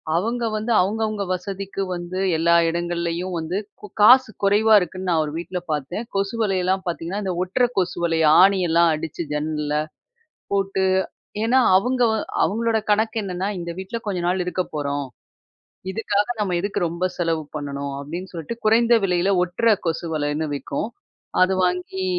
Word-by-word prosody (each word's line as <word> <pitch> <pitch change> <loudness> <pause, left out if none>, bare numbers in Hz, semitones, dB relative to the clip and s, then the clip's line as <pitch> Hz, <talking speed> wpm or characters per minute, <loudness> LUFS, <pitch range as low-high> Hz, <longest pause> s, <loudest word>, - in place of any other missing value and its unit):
அவங்க 230 +7 -1
வந்து 215 +2 -2
அவங்கவங்க 215 +1 -1
வசதிக்கு 195 +2 -5
வந்து 175 +1 -5 0.2
எல்லா 170 +1 +3
இடங்கள்லேயும் 170 +1 -2
வந்து 165 +4 -3 0.2
கு 210 - -8
காசு 250 +3 +7
குறைவா 210 +2 +4
இருக்குன்னு 185 +1 -4
நான் 160 -2 +3
ஒரு 150 - -5
வீட்டில 180 +1 -4
பார்த்தேன் 150 - -3
கொசு 195 +3 -1
வலையெல்லாம் 190 -2 +1
பார்த்தீங்கன்னா, 175 +4 -3
இந்த 190 -2 -1
ஒட்டுற 220 +7 +1
கொசு 185 -1 0
வலை 165 -1 +1 0.2
ஆணியெல்லாம் 175 -3 +4
அடிச்சு 160 +1 -5
ஜன்னல்ல 150 0 -2 0.8
போட்டு 195 -1 0 0.6
ஏன்னா 245 +3 +4 0.2
அவங்க 250 +5 +1 0.4
அவங்களோட 225 +2 +1
கணக்கு 220 +2 +2
என்னென்னா, 190 -1 -3
"இந்த 170 -1 -5
வீட்டில 190 +5 -4
கொஞ்ச 190 -3 -1
நாள் 180 +1 +1
இருக்க 180 +1 -1
போறோம். 145 -1 -2 0.8
இதுக்காக 205 -1 0
நம்ம 190 -4 0
எதுக்கு 200 +2 -2
ரொம்ப 170 +2 -3
செலவு 165 -2 0
பண்ணணும்?" 140 -1 -4
அப்படீன்னு 170 +6 -6
சொல்லிட்டு 170 +7 -6
குறைந்த 230 +2 +5
விலையில 180 +1 +2
ஒட்டுற 215 +5 +2
கொசு 165 +1 -2
வலைன்னு 150 +1 -1
விக்கும். 140 +6 -3 0.5
அது 185 +1 +3
வாங்கி 180 +1 -2
185 Hz, 145 wpm, -22 LUFS, 170-205 Hz, 0.8 s, காசு